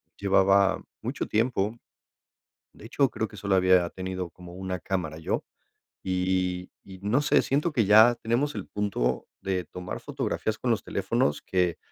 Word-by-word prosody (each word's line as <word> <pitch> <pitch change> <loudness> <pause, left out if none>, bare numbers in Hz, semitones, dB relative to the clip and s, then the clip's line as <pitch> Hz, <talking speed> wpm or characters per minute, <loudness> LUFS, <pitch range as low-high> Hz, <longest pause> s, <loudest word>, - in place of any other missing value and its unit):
llevaba 95 0 +3 0.2
mucho - - -3
tiempo. 110 -1 0 1.0
De - - -15
hecho, 135 +2 +2
creo 110 - -2
que 105 - -14
solo 100 0 0
había 90 -2 +4
tenido 95 -1 -5
como 90 0 -13
una 95 0 -4
cámara 90 -5 -3
yo, 80 - -2 0.6
y 90 -1 -1
y 95 - -12
y - - -11
no 120 +8 +2
sé, 150 - +4
siento 150 +5 0
que 115 -7 +2
ya 110 +4 +7
tenemos 125 +7 -1
el - - -5
punto 95 -12 -1
de 95 -2 -2
tomar 90 +1 -7
fotografías - - -2
con - - +1
los - - -1
teléfonos, 75 - 0
que 90 -2 0
95 Hz, 160 wpm, -27 LUFS, 90-110 Hz, 1.0 s, ya